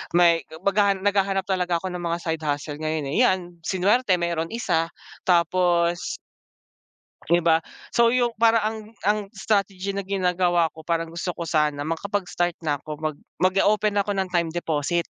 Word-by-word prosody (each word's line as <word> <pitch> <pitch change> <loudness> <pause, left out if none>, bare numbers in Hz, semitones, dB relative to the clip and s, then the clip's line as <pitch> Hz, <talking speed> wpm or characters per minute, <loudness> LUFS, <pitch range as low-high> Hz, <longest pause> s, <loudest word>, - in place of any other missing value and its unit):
may 170 -1 +5 0.2
maghaha 200 0 +3
naghahanap 195 0 +1
talaga 180 -2 0
ako 185 +1 -5
ng 180 0 -5
mga 170 0 -1
side 160 -1 -2
hustle 145 0 -3
ngayon, 155 -3 -2
eh. 250 - +4
Yan 175 -2 -2
swinerte 195 +4 +2
merong 170 -1 -1
isa, 165 -8 0 0.4
tapos 175 0 +2 1.1
'di 170 +1 +4
ba? 165 -1 +5 0.4
So, 235 0 +5
yung 245 -1 +3
parang 230 -1 +5
ang 220 +1 -1 0.3
ang 210 +1 +3
strategy 195 -1 -1
na 200 -1 -3
ginagawa 180 -3 +1
ko, 160 0 -13
parang 165 -1 -1
gusto 170 +1 -3
ko 170 - -5
sana 150 -2 +1
makapag 190 +6 -2
start 175 -1 0
na 150 -3 0
ko 155 - -5
mag 155 -2 -2 0.2
mag 185 +1 +3
o-open 210 0 +2
ako 205 +1 0
ng 190 -1 -1
time 170 -2 +1
deposit. 170 0 -1
175 Hz, 165 wpm, -24 LUFS, 165-195 Hz, 1.1 s, may